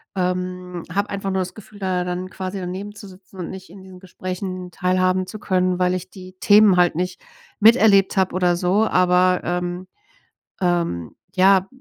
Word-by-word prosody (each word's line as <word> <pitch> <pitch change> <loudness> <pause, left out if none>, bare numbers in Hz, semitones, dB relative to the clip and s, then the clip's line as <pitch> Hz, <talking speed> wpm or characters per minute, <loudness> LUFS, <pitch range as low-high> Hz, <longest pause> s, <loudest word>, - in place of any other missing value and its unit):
ähm, 180 -1 -3
habe 200 +2 -1
einfach 195 -1 -3
nur 190 - 0
das 180 0 -6
Gefühl, 210 -1 -14
da 185 -2 -1
dann 180 +1 -4
quasi 190 +1 -5
daneben 190 +3 -6
zu 205 -1 -11
sitzen 190 0 -16
und 175 - -5
nicht 190 0 -9
in 195 - -13
diesen 185 -1 -13
Gesprächen 185 0 -6
teilhaben 185 +1 +1
zu 200 +3 -9
können, 185 -2 0
weil 180 0 +2
ich 185 0 -6
die 185 -1 -12
Themen 205 -2 +6
halt 175 0 +4
nicht 180 +2 -3 0.4
miterlebt 215 -3 +5
habe, 190 -2 +1
oder 180 -1 +2
so, 185 +5 +2
aber, 180 0 +3
ähm, 180 +1 -3 0.7
ähm, 170 - -1 0.2
ja. 190 0 +4
185 Hz, 175 wpm, -21 LUFS, 180-195 Hz, 0.7 s, Themen